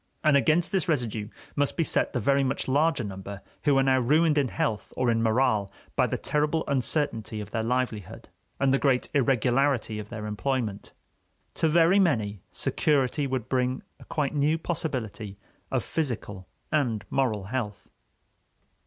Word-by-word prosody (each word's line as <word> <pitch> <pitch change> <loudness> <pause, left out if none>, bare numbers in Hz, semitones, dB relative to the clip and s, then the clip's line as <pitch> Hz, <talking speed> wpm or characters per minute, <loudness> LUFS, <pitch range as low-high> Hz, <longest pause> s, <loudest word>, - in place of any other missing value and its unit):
And 155 -2 +5
against 155 +5 +3
this 185 -2 0
residue 115 -8 -1 0.3
must 145 -1 0
be 165 - +3
set - - +1
the 125 - -1
very 140 +4 +2
much 135 0 -2
larger 145 0 +2
number 95 0 -7 0.2
who 145 -2 +4
are 135 - +4
now 130 -1 +3
ruined 150 +5 +3
in 145 -3 +2
health 110 -3 -2
or 125 -2 +2
in 115 0 +1
morale 110 -3 +2 0.2
by - - +3
the - - -2
terrible 150 +2 0
uncertainty 125 -4 -1
of 105 0 -7
their 110 - -1
livelihood 115 -4 -2 0.3
and 135 -1 +3
the 135 - +3
great 130 -3 +2
irregularity 130 -3 +2
of 105 0 -8
their 110 -2 -6
employment. 105 -1 -3 0.6
To 160 - +1
very 170 +4 +5
many, 110 - +1
security 140 -1 +1
would 130 -4 -3
bring 130 0 0 0.2
a - - -14
quite 150 -3 -1
new 150 +2 +2
possibility 125 - -4 0.3
of - - 0
physical 110 - -4 0.2
and 120 -9 0
moral 115 -7 0
health. 105 -6 -4
130 Hz, 160 wpm, -27 LUFS, 110-145 Hz, 0.6 s, And